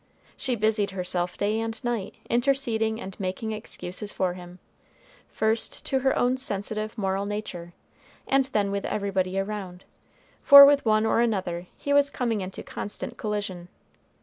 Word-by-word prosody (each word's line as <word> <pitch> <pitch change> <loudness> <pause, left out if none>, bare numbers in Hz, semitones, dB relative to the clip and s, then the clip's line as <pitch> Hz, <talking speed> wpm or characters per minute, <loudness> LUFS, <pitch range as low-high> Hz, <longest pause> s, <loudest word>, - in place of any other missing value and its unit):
She 260 -3 -2
busied 215 -2 +1
herself 180 -1 -2
day 210 +2 0
and 225 0 -4
night 240 -5 -3
interceding 235 -3 +1
and 195 -4 -8
making 195 +3 -3
excuses 210 -2 -5
for 185 -2 -1
him, 180 0 -11 0.7
first 220 +1 -1
to 265 - +1
her 265 0 +1
own 250 +1 +2
sensitive 215 -2 -3
moral 195 -1 -1
nature, 180 -5 -6 0.5
and 270 0 +3
then 210 -7 0
with 200 0 -2
everybody 195 -2 -1
around, 195 -2 -4 0.6
for 280 0 +11
with 285 0 +4
one 215 0 +3
or 220 - +2
another 185 -6 -1
he 285 - -2
was 285 0 +4
coming 235 -6 -1
into 185 0 -6
constant 205 - -5
collision. 205 -5 -4
210 Hz, 150 wpm, -26 LUFS, 190-230 Hz, 0.7 s, for